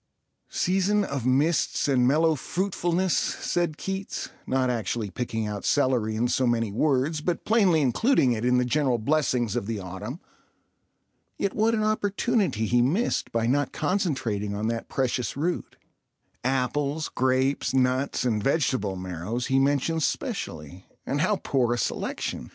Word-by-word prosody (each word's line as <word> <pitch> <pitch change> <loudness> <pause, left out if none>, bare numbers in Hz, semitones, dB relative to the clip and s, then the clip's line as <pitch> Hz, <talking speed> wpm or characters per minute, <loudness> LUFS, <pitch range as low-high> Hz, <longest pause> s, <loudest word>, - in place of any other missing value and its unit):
"Season 195 +3 +1
of 140 - -3
mists 145 +6 +2
and 125 -3 +3
mellow 160 +4 +4
fruitfulness," 180 +2 -1
said 175 -3 -1
Keats, 195 0 -4 0.2
not 130 0 +1
actually 115 -3 -2
picking 110 0 -3
out 105 -1 -4
celery 125 -6 +1
in 115 +3 +1
so 130 +1 +1
many 115 -3 +1
words, 145 +5 +1
but 170 +2 -2
plainly 195 -8 +4
including 140 - +3
it 115 -1 -1
in 125 0 +3
the 125 - +2
general 130 -1 +1
blessings 125 -3 0
of 100 - -2
the 115 -1 -2
autumn. 100 - -6 1.2
Yet 200 - -1
what 225 +2 +2
an 215 - 0
opportunity 205 - 0
he 120 +2 +3
missed 170 - 0
by 115 -1 0
not 140 +4 +1
concentrating 120 - -1
on 110 +2 -1
that 115 0 -4
precious 130 -1 -1
root. 170 +5 -2 0.7
Apples, 140 +4 0
grapes, 130 +2 +1
nuts, 130 +1 +1
and 110 -4 +1
vegetable 130 - +1
marrows 95 +6 -4
he 135 - +5
mentions 145 +4 +1
specially—and 95 - -5
how 205 +5 +2
poor 120 -3 +1
a - - -4
selection! - - -3
130 Hz, 145 wpm, -26 LUFS, 115-165 Hz, 1.2 s, he